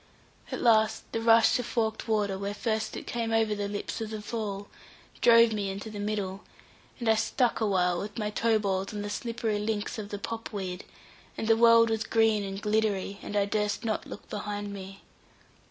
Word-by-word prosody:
At - - -3
last 220 -2 +4
the 225 - -2
rush 230 +1 +5
of 245 - -3
forked 220 -1 -1
water, 210 -3 +1
where 200 +1 -4
first 220 0 -2
it - - -7
came 230 -1 -2
over 225 -1 +2
the 205 -1 -2
lips 205 +2 -4
of 220 - -3
the 215 -1 -5
fall, 210 -2 -4 0.5
drove 230 -1 +7
me 205 -2 -1
into 200 +3 -6
the 210 - -6
middle, 205 -2 -3 0.6
and 235 - -3
I 220 - +6
stuck 230 +2 +1
awhile 180 -4 +2
with 205 +3 -6
my 210 -2 -2
toe 225 +1 +2
balls 195 -1 -2
on 205 - -3
the 205 - -4
slippery 225 0 -2
links 210 +2 -2
of 205 -1 -6
the 205 - -4
pop 225 +3 -5
weed, 190 -3 -5 0.5
and 220 - -3
the 225 - +6
world 230 0 +6
was 220 -1 0
green 225 -2 +2
and 195 0 -5
gliddery, 210 -2 0
and 205 - -6
I 200 - +3
durst 210 +2 -1
not 215 -1 -2
look - - -9
behind 205 0 -4
me. 195 0 -9
215 Hz, 200 wpm, -28 LUFS, 200-225 Hz, 0.6 s, drove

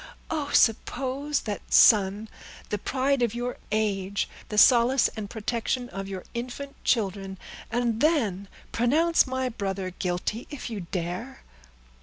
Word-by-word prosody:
Oh! 300 -3 -2
suppose 270 +5 +1
that 205 -3 -4
son 205 0 +5 0.4
the 210 - -2
pride 270 +4 0
of 235 -2 +1
your 245 +1 -3
age, 200 -2 0 0.2
the 210 - -4
solace 245 +3 +6
and 210 -3 -7
protection 240 +2 -2
of 195 +1 -6
your 190 -2 -6
infant 250 +4 -5
children, 195 -4 0 0.3
and 235 -1 0
then 220 - +1 0.2
pronounce 305 +8 +3
my 260 0 -1
brother 195 -5 -3
guilty, 180 +6 -3
if 280 -5 -7
you 200 -6 -5
dare!" 180 +9 -4
230 Hz, 130 wpm, -26 LUFS, 200-255 Hz, 0.4 s, solace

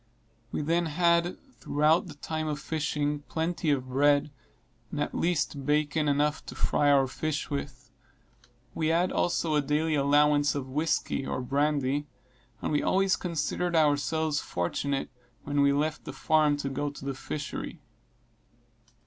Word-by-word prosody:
We - - -2
then 170 +2 +1
had, 170 +2 +2 0.2
throughout 155 +5 +2
the 155 - -10
time 155 +2 -4
of 150 -1 -2
fishing, 150 -1 -1
plenty 165 0 -1
of 135 -3 +1
bread, 145 +2 +3 0.6
and 150 - -5
at 145 - -1
least 155 -4 0
bacon 150 +1 +1
enough 145 +1 +1
to - - -7
fry 145 -1 +2
our 140 -1 +5
fish 150 +4 -3
with. 130 -3 -5 0.8
We 155 - -1
had 170 +3 +2
also 170 -2 0
a 150 - +3
daily 150 +3 0
allowance 145 0 +3
of 135 -2 -3
whisky, 150 0 -1
or 130 - -3
brandy, 140 +1 0 0.6
and - - -1
we 150 - +2
always 190 0 +2
considered 170 +1 -2
ourselves 155 0 +2
fortunate 135 +11 -2 0.3
when 145 0 0
we 140 0 +5
left 150 +2 -1
the - - -6
farm 155 -2 +2
to 140 -1 -3
go 145 +2 -2
to 140 -1 -10
the 140 - -2
fishery. 145 +2 -5
150 Hz, 150 wpm, -28 LUFS, 145-160 Hz, 0.8 s, our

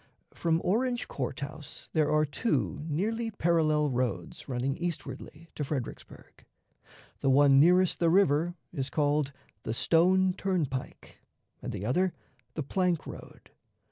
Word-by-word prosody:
From 165 -1 0
Orange 245 +5 0
Court 135 0 -4
House 150 0 -7
there 155 -2 +2
are 155 0 +3
two 140 - -1
nearly 225 +9 -1
parallel 155 -6 +2
roads 120 -4 -3
running 130 +2 -1
eastwardly 165 -1 -6
to 150 - -3
Fredericksburg. 135 -4 -7 0.8
The 135 - +1
one 135 0 +6
nearest 180 +4 +4
the 170 - +3
river 170 -2 +3 0.2
is 135 -1 -2
called 145 -1 +1 0.3
the 110 - -4
"Stone 185 +6 +3
Turnpike," 155 -9 -3 0.4
and - - -4
the 100 - -5
other 180 +10 +1 0.4
the 155 - -2
"Plank 180 +2 0
road." - - -11
155 Hz, 130 wpm, -29 LUFS, 135-180 Hz, 0.8 s, one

